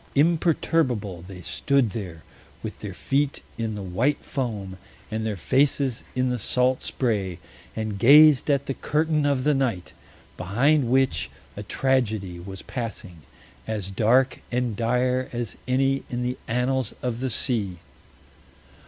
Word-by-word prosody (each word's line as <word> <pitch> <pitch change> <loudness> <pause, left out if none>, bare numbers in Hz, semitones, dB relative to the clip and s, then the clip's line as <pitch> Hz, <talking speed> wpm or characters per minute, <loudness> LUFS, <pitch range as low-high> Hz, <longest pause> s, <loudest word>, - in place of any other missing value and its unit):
Imperturbable 145 - +1
they 90 -2 -10
stood 135 - +1
there, 90 -7 -6 0.4
with - - -6
their - - -6
feet 140 +1 0 0.2
in 110 -2 -2
the 100 - -5
white 115 +11 0
foam 105 -9 -4 0.3
and 110 0 -2
their 105 - -2
faces 130 - +1
in 125 0 +1
the 125 - -1
salt 125 +4 +2
spray, 100 -8 -1 0.4
and 110 -2 -3
gazed 150 +4 +7
at 140 -1 +2
the 135 - -2
curtain 150 +1 +1
of 140 -3 +1
the 150 - +3
night, 120 -10 -1 0.4
behind 125 - +2
which 130 - +2 0.3
a 105 - -5
tragedy 110 -6 0
was 95 +2 -8
passing, 105 -8 -6 0.5
as 105 -3 -3
dark 125 +6 +3
and 125 -2 0
dire 125 +3 +1
as 120 -3 -3
any 135 +1 +2
in 120 0 -2
the 125 +1 -2
annals 125 +2 0
of 120 -2 -2
the 130 +1 -1
sea. 110 -6 -1
125 Hz, 140 wpm, -25 LUFS, 105-135 Hz, 0.5 s, gazed